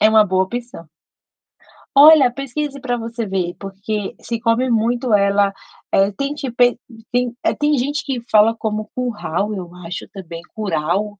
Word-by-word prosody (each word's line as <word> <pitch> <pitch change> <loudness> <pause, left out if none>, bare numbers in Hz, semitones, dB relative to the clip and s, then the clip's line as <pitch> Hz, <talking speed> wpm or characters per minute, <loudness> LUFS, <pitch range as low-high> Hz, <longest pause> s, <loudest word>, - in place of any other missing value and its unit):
é 215 - +6
uma 220 -1 +6
boa 190 -1 +1
opção. 235 -5 -7 1.1
Olha, 285 -3 +8
pesquise 275 +2 -4
para 245 -2 -1
você 230 0 -4
ver, 185 -3 -2
porque 200 +2 -5
se 230 -1 -4
come 230 +3 +1
muito 235 +1 +1
ela, 200 0 +3 0.4
eh, 195 +1 +3
tem 275 +8 -3
tipo 270 -5 -6
e 245 - +5
tem - - -35 0.3
tem 245 -1 0
é, - - +2
tem 295 0 +1
gente 285 +4 -1
que 270 -3 -3
fala 220 +1 +5
como 215 -1 -3
curral, 210 -5 -2
eu 180 -3 -7
acho 170 +1 -6
também, 170 -5 -9
curau, 200 +1 -1
220 Hz, 165 wpm, -19 LUFS, 195-245 Hz, 1.1 s, Olha